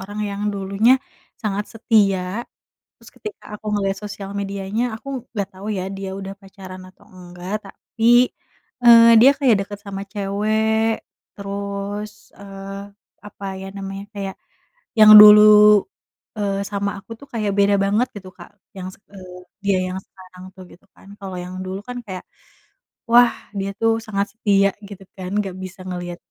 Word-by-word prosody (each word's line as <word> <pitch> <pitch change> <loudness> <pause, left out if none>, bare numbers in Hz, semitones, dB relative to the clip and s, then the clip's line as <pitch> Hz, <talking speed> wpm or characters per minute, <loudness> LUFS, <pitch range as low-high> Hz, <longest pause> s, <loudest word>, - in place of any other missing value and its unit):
orang 205 +2 -8
yang 200 0 -5
dulunya 200 +6 +2 0.4
sangat 205 -1 -2
setia 200 -2 +1 0.6
terus - - -15
ketika 415 - -9
aku 215 - -24
ngeliat 195 -1 -1
sosial 200 -1 -8
medianya 200 +2 -3
aku 250 - -13 0.3
nggak 200 -4 -2
tau 190 +2 -11
ya 185 +1 -4
dia 195 -1 -5
udah 195 0 -7
pacaran 190 -2 -12
atau 185 - -23
enggak 180 +1 -9
tapi, 235 +5 +2 0.6
eee, 230 0 +9
dia 270 +3 +8
kayak 260 -6 +4
deket 205 0 -9
sama 195 -1 -6
cewek 220 +2 0 0.3
terus, 200 +1 -6
eee, 195 0 -9 0.4
apa 200 -1 -10
ya 190 - -8
namanya 195 0 -7
kayak 195 -1 -5 0.6
yang 215 0 +10
dulu, 210 0 +8 0.5
eee, 200 -1 -1
sama 200 -1 -2
aku 195 - -19
tuh 280 - -14
kayak 215 -3 -1
beda 200 0 +4
banget 215 +6 +1
gitu 190 -2 -9
Kak - - -13 0.3
yang 185 -1 -6
s - - -17
eee, 185 -2 -11 0.3
dia 195 -2 +2
yang 185 - -4
sekarang 185 -1 -16
tuh 190 - -11
gitu 180 - -19
kan, 195 - -18
kalau 190 -2 -7
yang 180 +1 -7
dulu 190 +1 -5
kan 250 0 -7
kayak, 185 -1 -7 0.9
wah 240 0 +7 0.3
dia 195 +1 -3
tuh 225 0 +3 0.2
sangat 200 -1 -1
setia 200 -2 +2 0.2
gitu 200 -2 -11
kan 185 -1 -6
nggak 195 -3 -3
bisa 185 0 -9
ngeliat 175 -1 -5
200 Hz, 155 wpm, -21 LUFS, 195-210 Hz, 0.9 s, yang